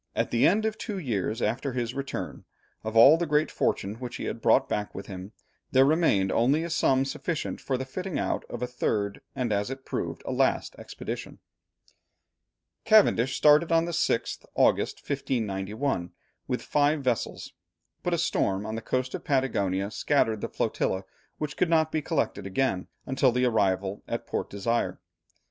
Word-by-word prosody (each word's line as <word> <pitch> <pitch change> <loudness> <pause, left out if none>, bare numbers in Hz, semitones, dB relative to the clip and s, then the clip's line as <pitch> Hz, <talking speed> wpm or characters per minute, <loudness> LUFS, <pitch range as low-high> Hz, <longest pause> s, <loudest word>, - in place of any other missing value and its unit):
At - - 0
the 115 - +4
end 215 +4 +2
of 220 -1 -2
two 210 -4 -4
years 115 - -2
after 130 +2 -1
his 120 -1 -2
return, 140 0 -5 0.4
of 110 +1 -2
all 135 +8 +9
the 170 0 -1
great 150 +1 +2
fortune 100 +3 -1
which 125 -1 -6
he - - -5
had - - -4
brought - - +4
back 105 0 -3
with 95 - -6
him, 95 0 -8 0.4
there 130 0 +6
remained 135 - +3
only 135 +7 +2
a 170 - -4
sum 135 -5 +3
sufficient 160 +4 -3
for 130 - -1
the 130 - -4
fitting 180 +6 -4
out - - -1
of 120 0 -5
a - - -1
third, 105 -5 -1
and 125 -5 -1
as 100 +3 0
it 135 0 -7
proved, - - -4
a - - -3
last - - +1
expedition. - - -6 1.5
Cavendish 200 - +4
started 150 +3 +5
on 165 0 +4
the 170 - -3
6th 160 -8 0
August, - - +2
1591, 110 -6 -2 0.4
with - - -2
five 145 0 +2
vessels, 125 -4 -2 0.5
but - - -1
a - - +2
storm 95 +1 0
on 110 - -4
the 115 - -3
coast 130 +2 -2
of - - -5
Patagonia 100 -8 0
scattered 110 -5 +1
the - - -3
flotilla, 95 +1 -1 0.3
which 150 -1 -4
could 180 - +1
not 160 -1 +3
be 155 - 0
collected 140 - -1
again 95 -3 0 0.2
until 130 -1 +2
the 125 +1 +1
arrival 100 -4 +1
at - - -3
Port - - -3
Desire. 115 +4 -1
130 Hz, 175 wpm, -27 LUFS, 105-150 Hz, 1.5 s, all